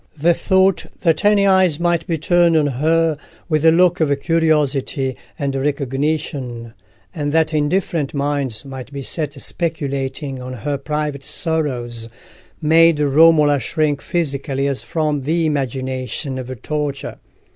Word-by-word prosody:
The 170 +4 +4
thought 190 +1 +2
that 165 +3 +2
any 205 -1 +4
eyes 190 -5 +3
might 175 -1 0
be 165 -3 0
turned 170 +1 +3
on 150 - +3
her 155 +3 +1 0.3
with 155 -2 0
a 165 - +7
look 180 +1 +3
of 145 -3 +1
curiosity 145 -5 +1 0.2
and 140 -1 -2
recognition, 135 -3 -2 0.4
and 145 -4 -2
that 160 0 +2
indifferent 155 -1 0
minds 140 -4 -2
might 135 -1 -8
be 140 -1 -6
set 150 -1 -4
speculating 140 -4 -3
on 130 0 -6
her 140 +4 -3
private 150 -1 -3
sorrows, 125 -10 -2 0.5
made 165 0 +4
Romola 150 0 +5
shrink 145 +3 -1
physically 140 -4 -1
as 135 -2 0
from 150 -3 -1
the 160 +4 0
imagination 130 -1 -3
of 130 -1 -7
torture. 150 -2 -3
150 Hz, 135 wpm, -19 LUFS, 135-165 Hz, 0.5 s, a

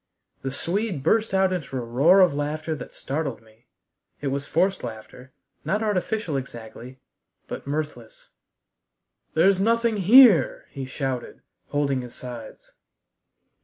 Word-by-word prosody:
The 135 - -3
Swede 175 - -2
burst 220 +8 +2
out 190 -1 +2
into 150 -7 -4
a - - -2
roar 140 +11 +4
of 180 -5 +5
laughter 155 +2 -3
that 155 - -8
startled 140 -4 -4
me. 110 +1 -24 0.5
It 140 - -2
was 140 +1 -3
forced 190 +4 +1
laughter, 120 +2 -9 0.3
not 210 +2 -1
artificial 210 -5 -1
exactly, 125 0 -9 0.5
but - - -7
mirthless. 145 -6 -5 1.0
"There's 185 +4 +4
nothing 230 +1 +2
here!" 205 - +6
he 135 -1 -6
shouted, 130 -2 -5 0.2
holding 140 -2 0
his 125 -1 -10
sides. 120 -3 -10
145 Hz, 130 wpm, -24 LUFS, 130-190 Hz, 1.0 s, here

